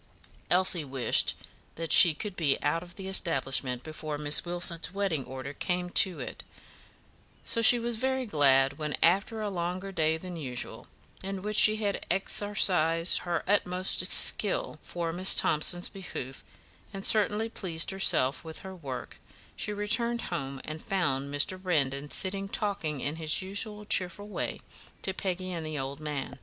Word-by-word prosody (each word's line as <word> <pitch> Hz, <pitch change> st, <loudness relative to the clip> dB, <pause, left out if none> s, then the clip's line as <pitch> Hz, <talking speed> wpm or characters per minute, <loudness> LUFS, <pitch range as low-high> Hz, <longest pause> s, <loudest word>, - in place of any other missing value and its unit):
Elsie 180 Hz, -2 st, +4 dB
wished 135 Hz, -3 st, +1 dB, 0.4 s
that 165 Hz, 0 st, -4 dB
she 170 Hz, -5 st, +9 dB
could 200 Hz, +4 st, -6 dB
be 150 Hz, -6 st, 0 dB
out 155 Hz, +3 st, 0 dB
of 175 Hz, -1 st, -13 dB
the 190 Hz, -1 st, -7 dB
establishment 135 Hz, -8 st, +1 dB
before 155 Hz, -1 st, -6 dB
Miss 150 Hz, 0 st, +3 dB
Wilson's 175 Hz, -1 st, -2 dB
wedding 195 Hz, -7 st, -2 dB
order 130 Hz, +2 st, -8 dB
came 180 Hz, +2 st, -3 dB
to 185 Hz, -1 st, +1 dB
it; -, -, -7 dB, 1.0 s
so 230 Hz, -, 0 dB
she 240 Hz, +2 st, +9 dB
was 235 Hz, -1 st, -3 dB
very 260 Hz, +2 st, -1 dB
glad 140 Hz, -, +2 dB
when, 150 Hz, -1 st, -3 dB
after 200 Hz, +6 st, +1 dB
a 210 Hz, -, -3 dB
longer 180 Hz, +2 st, -4 dB
day 160 Hz, -3 st, 0 dB
than 180 Hz, +1 st, -9 dB
usual, 130 Hz, -6 st, -6 dB, 0.3 s
in 195 Hz, 0 st, -6 dB
which 210 Hz, +1 st, -4 dB
she 215 Hz, -, +7 dB
had 205 Hz, -2 st, -3 dB
exercised 180 Hz, -3 st, +2 dB
her 175 Hz, -1 st, -3 dB
utmost 185 Hz, -2 st, 0 dB
skill -, -, +2 dB
for 170 Hz, -1 st, -5 dB
Miss 185 Hz, +3 st, +6 dB
Thomson's 175 Hz, +3 st, +3 dB
behoof, 135 Hz, -9 st, -9 dB, 0.5 s
and 195 Hz, -1 st, -8 dB
certainly 215 Hz, +1 st, +2 dB
pleased 175 Hz, -7 st, 0 dB
herself 145 Hz, -8 st, +2 dB
with 160 Hz, -1 st, -5 dB
her 190 Hz, 0 st, -8 dB
work, 135 Hz, -7 st, -8 dB, 0.4 s
she -, -, -3 dB
returned 230 Hz, +3 st, 0 dB
home 135 Hz, -4 st, -5 dB
and 155 Hz, 0 st, -7 dB
found 140 Hz, -10 st, -2 dB
Mr. 155 Hz, +6 st, 0 dB
Brandon 145 Hz, -6 st, -1 dB
sitting 195 Hz, +3 st, +1 dB
talking 170 Hz, -10 st, -2 dB
in 145 Hz, +3 st, -4 dB
his 160 Hz, +3 st, 0 dB
usual 210 Hz, +2 st, -2 dB
cheerful 190 Hz, 0 st, -1 dB
way 210 Hz, -, -5 dB, 0.4 s
to 190 Hz, -, -1 dB
Peggy 185 Hz, -1 st, -4 dB
and 170 Hz, -2 st, -5 dB
the 155 Hz, -1 st, -5 dB
old 135 Hz, +1 st, -5 dB
man. 150 Hz, -3 st, -6 dB
175 Hz, 155 wpm, -28 LUFS, 150-195 Hz, 1.0 s, she